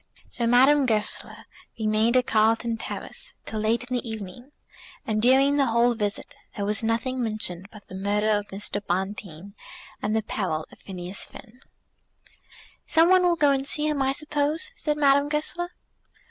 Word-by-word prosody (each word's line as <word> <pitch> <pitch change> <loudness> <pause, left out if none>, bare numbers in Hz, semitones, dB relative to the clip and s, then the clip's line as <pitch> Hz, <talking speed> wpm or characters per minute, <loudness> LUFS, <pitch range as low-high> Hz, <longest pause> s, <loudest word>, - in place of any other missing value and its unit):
So 235 - -2
Madame 265 +3 +5
Goesler 215 -3 +1 0.3
remained 220 +3 +2
at 250 - +2
Carlton 225 +1 +2
Terrace - - -7
till 220 - -4
late 220 +3 +1
in 250 0 -4
the 240 -1 -2
evening, 220 +5 -8 0.5
and 215 -1 -1
during 270 +4 +4
the 275 -2 +3
whole 235 +1 +3
visit 210 -3 -3 0.2
there 200 - -3
was 210 +2 +1
nothing 235 +3 -1
mentioned 215 -5 -3
but 210 -2 -13
the - - -12
murder 205 +3 0
of 205 -1 +1
Mr. 205 +1 -1
Bonteen 190 -1 -4 0.5
and 215 +1 -1
the 220 - 0
peril 180 -8 -3
of - - -17
Phineas 185 0 -7
Finn. 240 +2 -14 1.3
"Some 325 +2 +4
one 370 0 +6
will 350 -1 +3
go 295 -4 +3
and 270 0 0
see 300 +1 +3
him, 300 -2 0
I 265 0 +2
suppose," 295 - -1
said 300 -8 -1
Madame 285 0 +3
Goesler. 315 +4 -1
230 Hz, 165 wpm, -25 LUFS, 210-275 Hz, 1.3 s, one